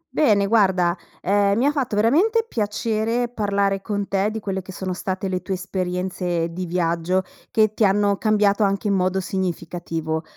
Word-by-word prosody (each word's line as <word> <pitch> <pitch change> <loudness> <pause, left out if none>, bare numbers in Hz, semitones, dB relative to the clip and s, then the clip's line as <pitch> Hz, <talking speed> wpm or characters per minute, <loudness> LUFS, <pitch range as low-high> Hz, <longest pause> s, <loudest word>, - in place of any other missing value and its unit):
Bene, 210 -9 +4
guarda, 190 -5 +3 0.3
ehm, 200 +1 +2
mi 245 - +2
ha 290 - +4
fatto 260 -7 -2
veramente 355 - +3
piacere 225 - -1
parlare 200 -3 0
con 205 -1 -3
te 195 +1 +1
di 220 +1 -4
quelle 195 -2 -3
che 190 - -10
sono 185 +1 -4
state 190 +1 -3
le 185 -1 -2
tue 190 - -3
esperienze 180 -2 -2
di 180 +1 -4
viaggio, 170 +1 0 0.3
che 215 -1 +2
ti 220 - 0
hanno 200 0 +3
cambiato 210 -1 +2
anche 200 +1 +1
in - - +2
modo 185 0 +1
significativo. 170 -4 -3
195 Hz, 170 wpm, -22 LUFS, 185-215 Hz, 0.3 s, Bene